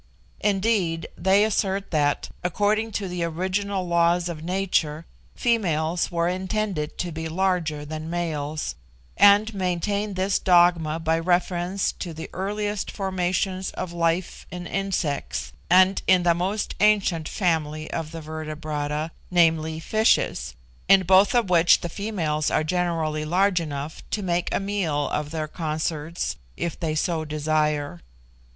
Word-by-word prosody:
Indeed 195 -5 +1
they 195 +2 +3
assert 200 -2 0
that, 145 -3 +1
according 210 +5 +1
to 200 - -2
the 180 -1 -3
original 185 +3 -1
laws 170 +1 +2
of 160 -2 -6
nature, 170 -4 0 0.3
females 175 -9 0
were 170 0 +1
intended 185 -3 -2
to 175 - -3
be 160 0 -4
larger 165 -4 0
than 155 +1 -6
males, 155 - -2 0.4
and 205 +2 +6
maintain 200 +2 -1
this 190 +1 +1
dogma 175 -3 +4
by 160 0 +1
reference 180 +2 0
to 170 -3 -7
the 160 - -7
earliest 205 +2 -2
formations 185 -1 -1
of 180 -2 -5
life 170 +1 -1
in 180 0 -7
insects, 145 - -2 0.2
and 185 +2 +5
in 185 -1 +5
the 170 -1 +4
most 190 +5 -2
ancient 195 -7 +2
family 155 -5 -1
of 160 -2 -3
the 165 -1 -7
vertebrata 155 0 -4 0.2
viz., 160 -2 +2
fishes 65 - +1 0.3
in 195 0 +6
both 190 +5 +5
of 235 -4 +3
which 170 -2 +5
the 175 - -4
females 165 -7 -1
are - - +1
generally 165 -2 -1
large 180 +3 +2
enough 150 -1 -5
to 210 - -2
make 175 -1 0
a - - +1
meal 185 -8 -1
of 150 0 -2
their 155 -1 -3
consorts 155 0 -3 0.2
if 170 - -3
they 160 -3 -1
so 160 0 0
desire. 150 - -1
175 Hz, 135 wpm, -24 LUFS, 155-190 Hz, 0.4 s, and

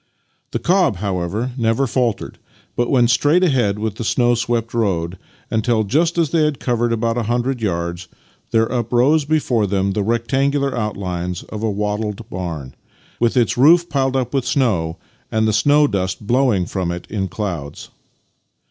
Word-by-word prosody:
" - - -46
The - - -1
cob, 180 - +2
however, 100 +5 -2
never 115 +3 +2
faltered, 120 -4 -1 0.4
but 120 +1 0
went 125 -3 +4
straight 150 +9 +3
ahead 120 - +2
along 110 +1 -2
the - - -4
snow 120 +2 +2
swept 115 -1 -1
road; 95 -6 -1 0.3
until, 110 0 +1
just 160 - +1
as 165 -4 +1
they 165 -2 +3
had 150 -2 0
covered 120 -1 0
about 115 +1 0
a 115 -1 -3
hundred 125 +1 -1
yards, 85 -3 -2 0.4
there 115 0 +3
uprose 125 +5 +2
before 135 -8 +1
them 100 0 0
the 105 - -1
rectangular 135 +6 0
outlines 90 -5 -3
of 110 - -7
a 110 - 0
wattled 105 +1 -3
barn, 80 -8 -5 0.5
with 120 +2 +1
its 120 0 +2
roof 170 +5 +5
piled 135 -3 0
with 135 -2 +1
snow 105 - 0 0.3
and 110 0 +1
the 110 - +1
snow 145 +6 +4
dust 100 -4 -2
blowing 120 -5 +2
from 90 -1 -2
it 85 0 -6
in 100 -2 -1
clouds. 85 -7 -5
115 Hz, 165 wpm, -19 LUFS, 100-130 Hz, 0.5 s, roof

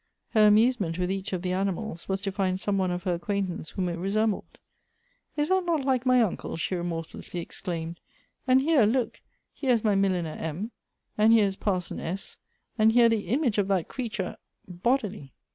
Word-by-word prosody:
Her 215 -2 +5
amusement 210 -5 +3
with 180 0 0
each 195 0 -3
of 185 -2 -3
the 180 - -1
animals, 195 -1 -3
was 190 0 -1
to 195 - -2
find 190 -1 0
some 195 0 0
one 185 -1 +1
of 180 0 -3
her 185 -2 0
acquaintance 180 -2 -3
whom 185 -2 -2
it 170 -1 -3
resembled. 210 +3 -1 0.4
" 485 -7 -42
Is 295 +1 +1
that 375 0 +3
not 325 -6 0
like 260 -2 +1
my 250 -1 +5
uncle?" 195 -5 -3
she 165 - -2
remorselessly 175 0 -4
exclaimed; 170 -1 -5 0.2
" - - -43
and 260 +1 +5
here, 290 -5 +4
look, 240 +1 -1 0.3
here 260 -3 +1
is 230 - +1
my 215 -2 +3
milliner 185 -5 +1
M., 170 +9 -4 0.5
and 215 +1 +6
here 220 -2 +6
is 195 -1 -1
Par 190 -2 0
son 175 - -7
S., 190 +4 -5 0.4
and 220 +1 +5
here 235 -1 +6
the 225 -2 0
image 245 -4 +1
of 195 - +1
that 190 -4 0
creature 220 -7 -4 0.3
bodily 195 - -1
200 Hz, 195 wpm, -27 LUFS, 180-230 Hz, 0.5 s, and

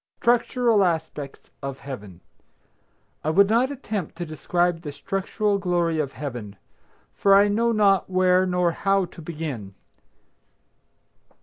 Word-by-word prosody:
STRUCTURAL 240 -2 +3
ASPECTS 160 -5 -3
OF 135 -1 -5
HEAVEN. 105 -10 -9 1.0
I 155 - 0
would 195 +5 +5
not 235 +5 +2
attempt 215 - -5
to 175 +1 -5
describe 175 +2 -1
the 150 -4 -6
structural 200 +5 -1
glory 175 -3 0
of 140 -3 -2
Heaven, 120 -8 -6 0.6
for 195 -1 +4
I 200 +1 +6
know 230 +3 +1
not 200 -5 +3
where 185 0 +3
nor 180 -1 +1
how 195 +2 +1
to 175 0 -13
begin. 150 - -6
180 Hz, 125 wpm, -24 LUFS, 150-200 Hz, 1.0 s, I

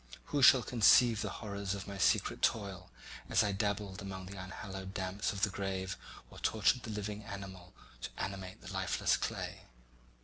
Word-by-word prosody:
Who 145 - +2
shall 130 -1 +8
conceive 115 -1 +5
the - - -2
horrors 100 -2 -4
of 100 0 -7
my 100 -1 -6
secret - - +2
toil 95 -4 0 0.4
as - - +4
I 105 - +1
dabbled 100 -1 -2
among 95 -1 -6
the 95 +2 -8
unhallowed 95 +1 -7
damps 95 +1 -1
of 100 0 -5
the 100 - +3
grave 95 -1 -3 0.4
or - - -11
tortured 110 +4 +2
the 115 - -7
living 105 0 -4
animal 95 -3 -8 0.3
to - - -4
animate 95 -1 -5
the 95 +1 -8
lifeless 95 -1 +1
clay? - - -4
100 Hz, 170 wpm, -34 LUFS, 95-105 Hz, 0.4 s, shall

